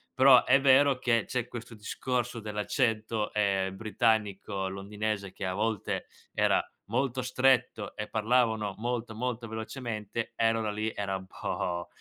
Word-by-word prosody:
Però 130 Hz, -1 st, +8 dB
è 135 Hz, +2 st, +5 dB
vero 135 Hz, 0 st, +5 dB
che 115 Hz, -4 st, +1 dB
c'è 125 Hz, -2 st, -2 dB
questo 115 Hz, -1 st, -8 dB
discorso 120 Hz, +2 st, -2 dB
dell'accento, 110 Hz, 0 st, -1 dB
ehm, 95 Hz, -2 st, +1 dB
britannico 105 Hz, -3 st, 0 dB
londinese 100 Hz, +1 st, -3 dB
che 95 Hz, -, -6 dB
a 95 Hz, -, -1 dB
volte 110 Hz, 0 st, -1 dB, 0.3 s
era -, -, +3 dB, 0.2 s
molto 130 Hz, +3 st, -1 dB
stretto 125 Hz, -4 st, +1 dB
e 105 Hz, -, -4 dB
parlavano 110 Hz, -2 st, +1 dB
molto, 120 Hz, -1 st, -2 dB
molto 120 Hz, 0 st, -3 dB
velocemente, 110 Hz, -1 st, -4 dB
e 115 Hz, 0 st, +3 dB
allora 110 Hz, -2 st, -1 dB
lì 110 Hz, +1 st, -2 dB
era 100 Hz, -1 st, -2 dB
un 95 Hz, -, -10 dB
po' 85 Hz, -2 st, -3 dB
110 Hz, 140 wpm, -29 LUFS, 105-125 Hz, 0.3 s, Però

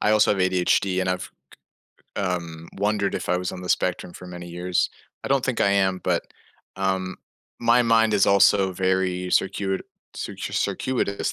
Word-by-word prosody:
I 105 Hz, -, +2 dB
also 105 Hz, -1 st, +4 dB
have 100 Hz, -, -2 dB
ADHD, 95 Hz, +1 st, +2 dB
and 95 Hz, -, -1 dB
I've, 90 Hz, 0 st, -3 dB, 0.9 s
k -, -, -1 dB
um, 85 Hz, -3 st, -4 dB
wondered 100 Hz, 0 st, 0 dB
if -, -, -4 dB
I 90 Hz, -, +2 dB
was 90 Hz, 0 st, -3 dB
on 90 Hz, -, -7 dB
the 90 Hz, -, -7 dB
spectrum 85 Hz, -, 0 dB
for 90 Hz, -, -11 dB
many 90 Hz, -1 st, -8 dB
years. 90 Hz, +1 st, -1 dB, 0.3 s
I -, -, -3 dB
don't 135 Hz, -1 st, +2 dB
think 130 Hz, -3 st, -1 dB
I 100 Hz, -, +4 dB
am, 95 Hz, -2 st, +2 dB
but, -, -, +1 dB, 0.5 s
um, 95 Hz, -1 st, -1 dB, 0.4 s
my 120 Hz, +1 st, +4 dB
mind 115 Hz, -2 st, +3 dB
is 100 Hz, -, +4 dB
also 100 Hz, -1 st, +4 dB
very 95 Hz, 0 st, 0 dB
circuit 95 Hz, 0 st, 0 dB, 0.3 s
cir -, -, -5 dB
circuitous 120 Hz, -6 st, -1 dB
95 Hz, 175 wpm, -24 LUFS, 90-100 Hz, 0.9 s, also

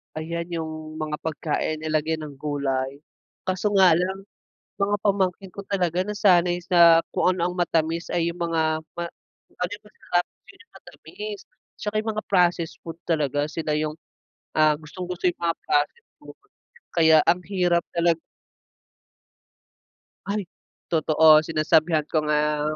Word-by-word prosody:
ayan 170 Hz, +2 st, -4 dB
yung 155 Hz, -1 st, -5 dB
mga 155 Hz, -1 st, -2 dB
pagkain 155 Hz, 0 st, -2 dB
nilagyan 155 Hz, 0 st, -1 dB
ng 145 Hz, -2 st, -8 dB
gulay, 140 Hz, -2 st, -2 dB, 0.5 s
kaso 185 Hz, +3 st, 0 dB
nga 190 Hz, -2 st, +7 dB
lang 190 Hz, +3 st, -2 dB, 0.6 s
mga 205 Hz, +1 st, +2 dB
pamangkin 195 Hz, -1 st, 0 dB
ko 200 Hz, -, -6 dB
talaga 180 Hz, -2 st, 0 dB
nasanay 180 Hz, -4 st, +3 dB
sa 170 Hz, -2 st, +6 dB
kung 185 Hz, -, +3 dB
ano 175 Hz, -1 st, 0 dB
ang -, -, -7 dB
matamis 165 Hz, -1 st, 0 dB
ay 170 Hz, -1 st, 0 dB
yung 170 Hz, -, -10 dB
mga 160 Hz, -2 st, 0 dB, 0.2 s
ma 170 Hz, -, -2 dB, 0.4 s
kung -, -, -30 dB
ano 180 Hz, -, -1 dB
yung 210 Hz, +1 st, -13 dB
masarap, 175 Hz, -4 st, -2 dB, 0.2 s
yun -, -, -19 dB
yung -, -, -34 dB
matamis. 210 Hz, -1 st, -9 dB, 0.4 s
Tsaka 210 Hz, 0 st, -4 dB
yung 220 Hz, -, -2 dB
mga 215 Hz, -, -3 dB
processed 175 Hz, -3 st, +2 dB
food 165 Hz, 0 st, -7 dB
talaga 145 Hz, -2 st, +1 dB
sila 155 Hz, -1 st, -2 dB
yung, 155 Hz, 0 st, -2 dB, 0.6 s
ah, 155 Hz, -1 st, +5 dB
gustong 160 Hz, +4 st, -8 dB
gusto 180 Hz, 0 st, -6 dB
yung 175 Hz, -, -2 dB
mga 170 Hz, -1 st, 0 dB
processed 295 Hz, -, 0 dB
food, -, -, -13 dB, 0.6 s
kaya 160 Hz, -1 st, +6 dB
ang 175 Hz, +2 st, +4 dB
hirap 180 Hz, -3 st, +1 dB
talag 170 Hz, -1 st, +2 dB, 2.1 s
Ay, 200 Hz, -1 st, -2 dB, 0.4 s
totoo 155 Hz, -1 st, +5 dB
sinasabihan 155 Hz, 0 st, +2 dB
ko 155 Hz, 0 st, 0 dB
nga 150 Hz, 0 st, +1 dB
170 Hz, 145 wpm, -24 LUFS, 155-180 Hz, 2.1 s, nga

